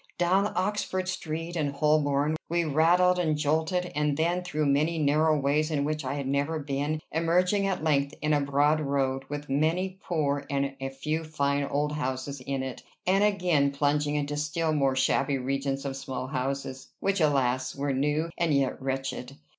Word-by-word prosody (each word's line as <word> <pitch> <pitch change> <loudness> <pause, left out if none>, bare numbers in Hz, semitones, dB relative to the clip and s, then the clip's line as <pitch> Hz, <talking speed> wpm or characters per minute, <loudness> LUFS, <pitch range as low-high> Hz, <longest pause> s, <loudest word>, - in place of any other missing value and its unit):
Down 190 +4 +2
Oxford 185 -1 -1
Street 165 -2 -4
and 145 -4 -1
Holborn 150 0 +2
we 170 +1 +1
rattled 175 +4 +4
and 155 -4 +1
jolted, 160 +4 0
and 150 -1 0
then 175 +3 +1
through 155 -4 -1
many 150 +4 +2
narrow 155 +1 +3
ways 145 +3 +1
in 145 -3 0
which 155 0 -2
I 135 +2 -2
had 140 -2 -3
never 140 +4 0
been, 145 +1 -2
emerging 180 +5 +2
at 185 -5 -2
length 140 -2 +1
in 150 +1 +1
a 145 - +3
broad 145 +2 +2
road, 135 -2 -1
with 145 0 -5
many 170 +7 0
poor 145 -4 -1
and 140 -1 -1
a 135 - -2
few 150 +4 -3
fine 140 -2 0
old 145 +1 -1
houses 140 -1 -3
in 135 0 -3
it; 130 -1 -6 0.2
then 190 +2 +3
again 180 -9 +3
plunging 145 +1 0
into 145 0 -2
still 155 +2 0
more 135 -3 +2
shabby 135 +1 +2
regions 135 +1 -2
of 135 -1 -3
small 130 -1 -5
houses, 135 0 -3
which, 195 -2 0
alas! 130 -4 +1
were 140 0 -1
new, 150 +5 0
and 165 -4 +2
yet 135 -1 0
wretched! 135 0 -4
150 Hz, 175 wpm, -28 LUFS, 140-160 Hz, 0.2 s, rattled